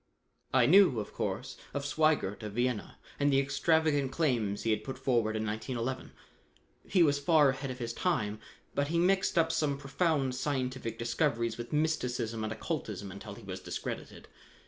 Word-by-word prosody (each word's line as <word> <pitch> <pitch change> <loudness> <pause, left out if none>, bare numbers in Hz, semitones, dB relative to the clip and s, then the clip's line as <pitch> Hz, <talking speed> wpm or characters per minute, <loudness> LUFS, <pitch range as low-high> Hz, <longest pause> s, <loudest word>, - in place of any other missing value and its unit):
I - - +5
knew, 175 - +6
of 105 - -6
course, 110 +7 -3 0.2
of 140 0 -2
Sweigert 145 -9 +1
of 105 -2 -6
Vienna, 120 -1 -1 0.2
and 145 0 +3
the 135 - +4
extravagant 140 0 +2
claims 120 -10 0
he 115 - +1
had 110 - 0
put 130 -1 -6
forward 120 -4 +1
in 110 0 -1
1911. 115 +4 -3 0.8
He 180 -3 +4
was 145 -2 +3
far 150 -1 +5
ahead 135 +1 -3
of 130 - -5
his 115 -2 -4
time, 110 - -1 0.3
but 140 0 0
he 170 +3 0
mixed 185 +2 +2
up 165 -1 +4
some 150 -3 0
profound 140 -1 0
scientific 130 -3 -2
discoveries 115 -1 0
with 120 - -6
mysticism 125 -7 0
and 110 - -2
occultism 110 - -4
until 100 +2 -8
he 115 - -13
was 95 -1 -6
discredited. - - -6
130 Hz, 170 wpm, -31 LUFS, 115-150 Hz, 0.8 s, knew